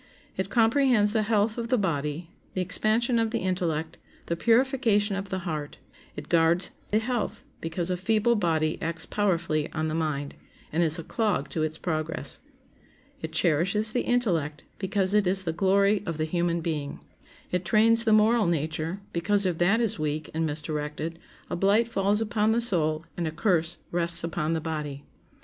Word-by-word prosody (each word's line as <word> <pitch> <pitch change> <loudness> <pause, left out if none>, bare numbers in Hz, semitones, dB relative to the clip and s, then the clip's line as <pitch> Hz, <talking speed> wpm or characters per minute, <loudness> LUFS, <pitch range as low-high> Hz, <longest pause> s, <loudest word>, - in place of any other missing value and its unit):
It 190 0 -2
comprehends 230 -2 +3
the 220 - +2
health 215 +1 +1
of 230 - -3
the 250 +1 +2
body, 165 -3 -2 0.2
the 185 - 0
expansion 220 +6 +1
of 225 -1 +1
the 230 - -1
intellect, 175 -4 -2 0.3
the 170 - -1
purification 230 - +2
of 195 0 -5
the 190 - -2
heart. 155 -4 -4 0.4
It 150 0 -7
guards 170 +2 +2 0.2
the 210 - +2
health, 230 -1 -2 0.2
because 170 +2 -3
a 180 - 0
feeble 220 +5 +2
body 160 -5 0
acts 165 0 -3
powerfully 170 -7 0
on 155 0 -1
the - - -3
mind, 150 -3 -2 0.4
and 160 - +1
is 160 0 +3
a 165 - -5
clog 200 -10 -1
to 160 - -3
its 155 0 -1
progress. 155 -4 -3 0.8
It 160 - -5
cherishes 185 +7 +3
the 245 - +1
intellect, 170 -12 0 0.2
because 195 0 0
it 210 -3 +3
is 190 +1 +1
the 165 -3 -2
glory 200 +3 +3
of 165 -2 -3
the 155 - 0
human 170 +1 0
being. 150 -4 -3 0.5
It 180 0 0
trains 225 +5 +4
the 225 - +2
moral 215 0 +4
nature, 160 +3 -2
because 200 +4 +2
if 175 -3 -1
that 195 +6 +3
is 225 -8 -1
weak 155 0 -2
and 160 0 0
misdirected 150 +1 -4 0.3
a - - -3
blight 200 +5 +3
falls 205 -1 +1
upon 220 0 +1
the 235 - +2
soul 160 -8 +1
and 170 -2 -2
a - - -2
curse 170 -1 0
rests 170 -1 +2
upon 165 -1 -1
the 160 - -1
body. 150 -3 -4
175 Hz, 175 wpm, -27 LUFS, 160-210 Hz, 0.8 s, trains